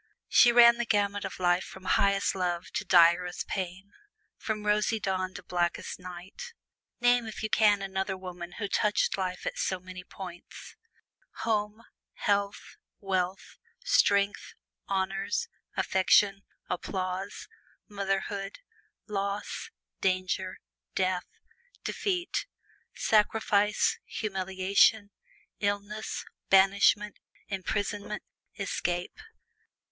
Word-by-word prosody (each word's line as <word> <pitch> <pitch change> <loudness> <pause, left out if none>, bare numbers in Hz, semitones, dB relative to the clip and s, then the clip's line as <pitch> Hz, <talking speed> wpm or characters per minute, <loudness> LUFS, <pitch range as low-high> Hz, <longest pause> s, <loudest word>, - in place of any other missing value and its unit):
She 240 - +7
ran 235 0 +8
the 240 - -1
gamut 205 -1 +1
of - - -6
life 175 0 +3
from 190 0 -11
highest 200 +1 +2
love 175 -2 -2
to - - -2
direst 175 -1 +4
pain 190 +1 -5 0.4
from 215 -1 -4
rosy 210 +1 +2
dawn 185 -2 -2
to - - -8
blackest 175 0 -2
night. 185 - -9 0.5
Name 245 -1 +3
if 220 - -7
you 220 - -2
can 205 -2 +4
another 190 0 -2
woman 180 -2 -8
who 205 - -3
touched 210 +1 +1
life 185 -2 -3
at - - -3
so 185 - 0
many 185 0 -9
points! 180 -2 -10 0.7
Home, 215 0 -1 0.3
health, 200 -1 -1 0.2
wealth, 190 -1 -2 0.2
strength, 200 0 +2 0.3
honors, 195 - -1 0.3
affection, 195 +1 +3 0.3
applause, 185 +1 -4 0.4
motherhood, 195 -1 -3 0.5
loss, 200 -1 -3 0.3
danger, 185 0 -1 0.4
death, 185 -1 0 0.6
defeat, 365 0 -2 0.5
sacrifice, 210 -1 +2
humiliation, 195 +1 +2 0.5
illness, 205 +1 -2 0.2
banishment, 200 +2 +4 0.3
imprisonment, 205 +1 -3 0.3
escape. 180 - -2
195 Hz, 100 wpm, -29 LUFS, 185-210 Hz, 0.7 s, ran